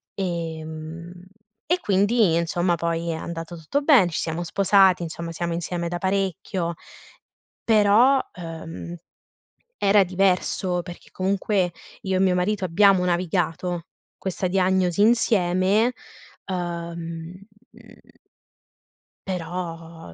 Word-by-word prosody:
Ehm, 165 -1 -5 0.4
e 355 +2 +2
quindi 205 - +2
insomma 175 +1 +1
poi 170 0 -2
è - - -2
andato 165 +1 -6
tutto 220 - -2
bene, 270 - +5
ci - - -2
siamo 165 +1 -3
sposati, 190 0 +4
insomma 165 0 -6
siamo 170 0 -3
insieme 170 0 -3
da 175 - -3
parecchio, 190 -2 -1 0.9
però, 225 +5 +5
ehm, 165 0 -7 0.8
era 200 0 +4
diverso 185 -1 0
perché 175 -1 -11
comunque 190 -1 0 0.3
io 190 -1 0
e - - 0
mio 190 -1 +3
marito 190 +1 0
abbiamo 190 +1 +4
navigato 175 -1 -1 0.3
questa 185 0 -3
diagnosi 185 0 +1
insieme, 210 0 +3 0.5
uhm, 170 -2 -5 0.4
mhmm - - -19 1.1
però, 165 - -6
180 Hz, 105 wpm, -24 LUFS, 170-195 Hz, 1.1 s, bene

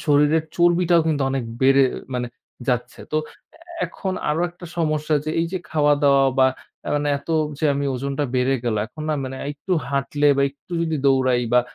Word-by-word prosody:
শরীরের 150 +1 +3
চর্বিটাও 175 0 +4
কিন্তু 150 -3 +1
অনেক 135 -3 -1 0.2
বেড়ে 135 +1 +5 0.3
মানে 125 -1 -1 0.4
যাচ্ছে। 125 -1 -1
তো - - +1 0.7
এখন 190 -1 -4 0.2
আরো 150 +2 +1
একটা 175 0 -12
সমস্যা, 155 -1 0
যে 155 - -2
এই 165 - 0
যে 185 - -1
খাওয়া 150 -2 +3
দাওয়া 140 -1 +5
বা 130 - +6 0.4
আ - - -3
মানে 145 0 -1
এত 140 - -21 0.3
যে - - -2
আমি 140 0 -1
ওজনটা 140 +3 -2
বেড়ে 130 +2 +2
গেল। 115 -3 0
এখন 155 +6 -10
না 155 - +1
মানে 130 0 -6 0.2
একটু 150 +6 -5 0.2
হাঁটলে 140 +1 0
বা 140 - +3
একটু 140 +5 -17
যদি 160 -2 -1
দৌড়াই 130 -2 +3
বা 125 - +7
145 Hz, 185 wpm, -22 LUFS, 135-160 Hz, 0.7 s, বা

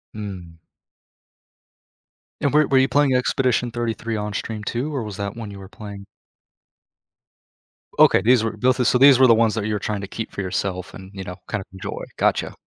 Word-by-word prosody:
Mm. 90 -6 -8 1.8
And 140 0 +1
were 150 0 +5
were 135 - +3
you 130 +1 +4
playing 140 -2 +2
Expedition 125 -1 +1
33 115 -1 -3
on 105 0 -3
stream 105 0 -4
too, 135 +8 -3
or 125 - -2
was 105 -2 -7
that 100 +1 -4
one 110 -3 -7
you 100 - -10
were 95 - -10
playing? 100 -1 -10 1.9
Okay, - - +6
these 120 0 +4
were 115 - -2
both 125 +4 +1
of 125 - +2
so 125 - +4
these 135 -2 +8
were 130 - +6
the 115 - +7
ones 115 -1 +2
that 110 -2 -2
you 110 - -1
were 105 - -1
trying 105 -1 -3
to 100 - -6
keep 110 +2 -6
for 100 - -5
yourself, 95 0 -3
and, 95 0 -11
you 95 -1 -6
know, 90 +1 -8
kind 105 - -2
of - - -12
enjoy, 95 - -6
gotcha. - - +1
110 Hz, 205 wpm, -22 LUFS, 100-125 Hz, 1.9 s, these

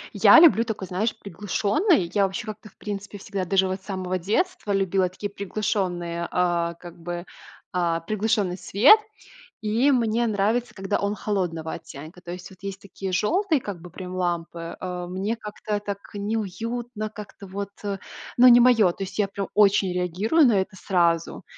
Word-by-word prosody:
Я - - +8
люблю 300 -9 +7
такой, 215 -5 -5
знаешь, 215 +5 -1
приглушенный. 205 - +1
Я, 200 -2 +4
вообще, 195 +5 -5
как-то, 215 0 -8
в - - -30
принципе, 205 -1 -6
всегда, 195 -1 -4
даже 190 +1 +2
вот 190 +1 -3
с - - -23
самого 185 -2 -3
детства, 215 - -1
любила 190 -1 +1
такие 200 +2 -6
приглушенные 180 -4 -2
а, 170 -1 +1
как 170 0 -12
бы, 175 +1 -5 0.5
а, 170 -2 0
приглушенный 210 -1 0
свет. 265 - +6 0.6
И 230 +7 +2
мне 235 -1 +2
нравится, 220 +4 0
когда 195 -1 -1
он 200 +1 -1
холодного 175 -7 -2
оттенка. 160 +3 -10
То 175 -1 -7
есть, 180 0 -8
вот 190 - -15
есть 195 0 -6
такие 195 -1 -6
жёлтые, 320 - +2
как 195 -6 -6
бы, 180 - -10
прям, 180 +1 -7
лампы. 170 -2 -3
Э, 180 -1 -4
мне 195 +5 -2
как-то 210 -1 -4
так 200 -1 -4 0.2
неуютно, 220 +2 -3
как-то 205 -2 -10
вот 200 +1 -5 0.7
ну, 250 +1 +8
не 240 0 +9
моё. 230 -7 +5
То 195 - -5
есть, 190 - -9
я 205 - +2
прям 200 0 -4
очень 200 -2 +4
реагирую 185 - +2
на 205 -5 +4
это 190 +1 -4
сразу, 170 -3 0
195 Hz, 170 wpm, -24 LUFS, 180-215 Hz, 0.7 s, не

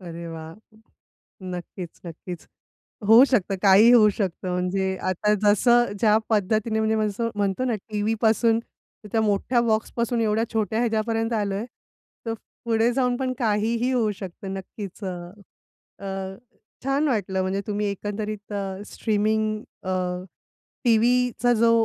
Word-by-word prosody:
अरे 170 -1 -8
वाह! 160 0 -8 0.9
नक्कीच, 180 -1 -7
नक्कीच. 170 +1 -8 0.6
होऊ 225 +4 +9
शकतं 200 -5 +2
काहीही 205 +4 +7
होऊ 215 -3 +7
शकतं. 190 -3 -3
म्हणजे 190 +1 -1
आता 210 +3 +1
जसं 240 +3 +4
ज्या 215 0 +5
पद्धतीने 220 +1 +1
म्हणजे 220 0 +1
जसं 230 +3 -2
म्हणतो 200 +3 0
ना 240 - +1
टीव्हीपासून 225 +2 +2
तर 225 - -18
त्या 225 - +2
मोठ्या 220 +3 +1
बॉक्सपासून 235 +1 0
एवढ्या 220 0 +1
छोट्या 220 0 0
ह्याच्यापर्यंत 225 0 0
आलो 205 -3 0
आहे, 210 +4 -3 0.6
तर 225 - -1 0.3
पुढे 230 +1 +2
जाऊन 250 -2 +1
पण 260 -1 -1
काहीही 230 +2 +1
होऊ 230 -4 +2
शकतं. 190 0 -7
नक्कीच 195 +1 -8
अ, - - -2 0.9
अ, 195 -1 -5 0.5
छान 275 +3 +1
वाटलं 195 -7 0
म्हणजे 190 +1 -1
तुम्ही 210 0 -1
एकंदरीत 205 +1 -5
अ, 195 -1 -4
स्ट्रीमिंग 215 0 0 0.2
अ, 185 -1 -2 0.9
टीव्हीचा 245 +1 +3
जो 230 0 +5
215 Hz, 130 wpm, -24 LUFS, 195-230 Hz, 0.9 s, होऊ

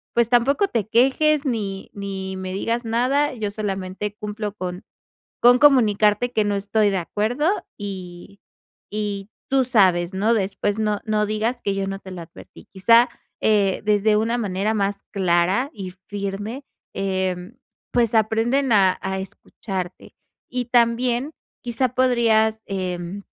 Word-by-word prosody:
pues, 235 -1 +3
tampoco 270 +10 +3
te 230 - -2
quejes 280 +6 +3
ni 205 -7 -3
ni 190 -1 -5
me 185 0 -5
digas 230 +5 -2
nada, 255 +6 +1
yo 210 -3 -3
solamente 200 0 -4
cumplo 210 -1 -5
con 185 -1 -5 0.6
con 245 +1 +6
comunicarte 225 -4 +4
que 215 - +2
no 205 0 0
estoy 205 +1 +1
de 195 - 0
acuerdo 215 - -1 0.3
y 190 -1 -8 0.5
y 205 -1 -3 0.2
tú 270 -1 +4
sabes, 185 -7 +3
¿no? 210 +5 +2
Después 205 0 -1
no 210 -1 0
no 215 -1 +1
digas 220 +4 -1
que 200 - 0
yo 195 0 -2
no 195 0 -3
te 190 - -11
lo 180 -2 -7
advertí". 165 - -14
Quizá, 230 +5 +5 0.3
eh, 200 -3 +2
desde 210 0 +3
una 225 +2 0
manera 205 -1 -1
más 200 -1 0
clara 190 - +1
y 190 -3 -7 0.2
firme, 205 +6 -4 0.3
em, 190 +2 -2 0.3
pues, 235 -2 +2
aprenden 225 +5 +2
a 190 -3 +4
a 190 0 -2
escucharte, 190 -1 -7 0.4
y 250 0 -2
también 240 +3 +1 0.3
quizá 245 +1 0
podrías, 225 -4 +3
em, 185 0 -4
210 Hz, 140 wpm, -22 LUFS, 195-235 Hz, 0.6 s, con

